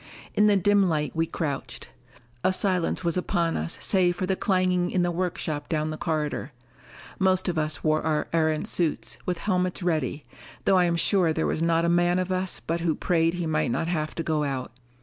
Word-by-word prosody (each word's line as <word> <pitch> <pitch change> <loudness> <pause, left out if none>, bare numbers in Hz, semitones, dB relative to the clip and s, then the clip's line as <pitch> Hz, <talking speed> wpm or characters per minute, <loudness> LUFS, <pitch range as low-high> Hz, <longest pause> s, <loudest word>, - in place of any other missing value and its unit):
In 210 - +4
the 205 - +5
dim 200 0 +3
light 150 -1 -1
we 165 0 +1
crouched. 145 -5 -4 0.5
A 185 - +3
silence 185 -1 0
was 170 0 +1
upon 170 -2 0
us 80 +2 -3
save 180 -3 +3
for 185 - -2
the 190 +1 0
clanging 185 -2 +1
in 180 -1 +1
the 175 - +1
workshop 165 -4 -3
down 155 -1 -1
the - - -4
corridor. 155 -3 -2 0.7
Most 185 0 +2
of 170 -3 0
us 155 -1 -1
wore 155 0 +2
our 155 -1 0
Erentz 160 -2 +1
suits, 170 -4 -1
with 180 -1 0
helmets 180 -1 -1
ready, 155 -4 -1 0.4
though 190 -1 +5
I 180 - +4
am 170 -1 +1
sure 175 0 +2
there 160 - -1
was - - -1
not 165 0 +2
a - - +2
man 175 +1 +3
of 185 0 -1
us 185 0 -1
but 165 +1 -2
who 165 -2 +1
prayed 165 -1 +1
he 175 -1 -2
might 155 -4 0
not 165 +7 -1
have 155 -3 -2
to 165 - -2
go 155 -2 0
out. 135 -4 -3
170 Hz, 210 wpm, -26 LUFS, 155-180 Hz, 0.7 s, the